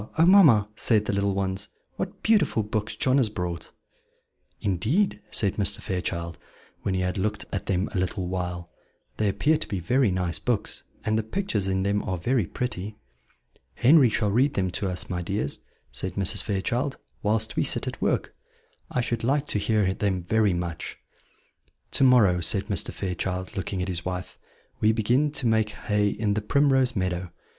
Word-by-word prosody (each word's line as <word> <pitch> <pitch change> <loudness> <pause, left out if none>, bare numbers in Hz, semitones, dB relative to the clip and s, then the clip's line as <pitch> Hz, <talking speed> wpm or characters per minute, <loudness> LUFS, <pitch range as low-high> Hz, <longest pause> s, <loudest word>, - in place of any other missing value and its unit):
oh, 165 - +6
mamma!" 155 - +7
said 110 -1 +2
the - - -1
little 100 0 0
ones, 100 +1 -1 0.3
"what - - -5
beautiful 210 - +3
books 105 +1 -3
John 130 +1 +2
has 125 -6 +3
brought!" 90 -5 -5 0.9
"Indeed," 105 - 0
said 100 -2 +1
Mr. 100 -1 +1
Fairchild, 85 -2 -3 0.4
when 95 - -1
he 95 - 0
had 90 +2 -1
looked 105 +1 -2
at 100 - -3
them 95 +1 0
a 95 - 0
little 90 0 -2
while, 90 -1 -4 0.5
"they 105 -2 +1
appear 150 +10 +2
to 155 - -5
be 100 - -3
very 125 +7 +2
nice 90 -4 -1
books, 105 +6 -2 0.2
and 110 +1 +1
the - - +2
pictures 110 - -2
in 95 0 0
them 100 +1 +1
are 95 - -3
very 115 +2 0
pretty." 105 -5 -4 0.8
"Henry 135 0 +6
shall 105 -2 0
read 130 +7 +2
them 95 -2 0
to 100 - -2
us, 90 -1 -3
my 90 -1 -3
dears," 95 -3 -2 0.3
said 95 -1 -4
Mrs. 100 +1 +3
Fairchild, 120 +7 -1 0.2
"whilst 110 +1 0
we - - +2
sit - - 0
at - - -6
work; - - 0 0.6
I 125 - 0
should 120 -1 -2
like 140 +4 +1
to 105 - 0
hear 105 -3 +1
them 95 -3 -1
very 105 +1 +2
much." 85 -2 -4 0.9
"To - - +2
morrow," 110 -9 +5
said 95 +4 +1
Mr. 100 -5 +2
Fairchild, 95 +2 -4
looking 95 -1 -2
at - - -4
his 85 -2 -3
wife, 90 0 -5 0.4
"we 110 +1 +3
begin 120 +7 +2
to 140 - -3
make 110 -1 +2
hay 105 -1 0
in 105 0 -1
the 105 - -1
Primrose 135 +1 +2
Meadow. 90 -2 -2
100 Hz, 180 wpm, -26 LUFS, 95-115 Hz, 0.9 s, mamma